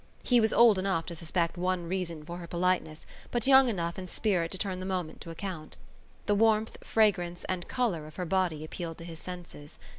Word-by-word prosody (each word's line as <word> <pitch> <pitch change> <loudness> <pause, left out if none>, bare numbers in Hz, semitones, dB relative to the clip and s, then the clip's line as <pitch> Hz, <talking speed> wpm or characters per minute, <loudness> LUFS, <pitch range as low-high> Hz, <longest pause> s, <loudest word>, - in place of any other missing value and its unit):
He 245 -1 +4
was 220 -1 +3
old 230 -5 +6
enough 190 -4 0
to 170 - -6
suspect 170 +1 -1
one 180 -1 -1
reason 170 -4 -3
for 170 +2 -6
her 175 -1 -8
politeness 175 -3 -1 0.2
but 240 -2 -1
young 265 -1 +7
enough 170 -4 -2
in 185 - -6
spirit 180 -3 0
to 190 - -3
turn 185 -2 -2
the 185 - -5
moment 180 -4 -3
to - - -8
account. 165 -2 -6 0.5
The 205 - +2
warmth, 220 +1 +3
fragrance 180 -6 +1
and 185 -2 -3
colour 190 -12 -1
of 155 - -13
her 180 - -3
body 175 -4 0
appealed 165 0 -6
to 165 - -9
his 165 -2 -8
senses. 175 -5 -9
180 Hz, 205 wpm, -29 LUFS, 170-200 Hz, 0.5 s, young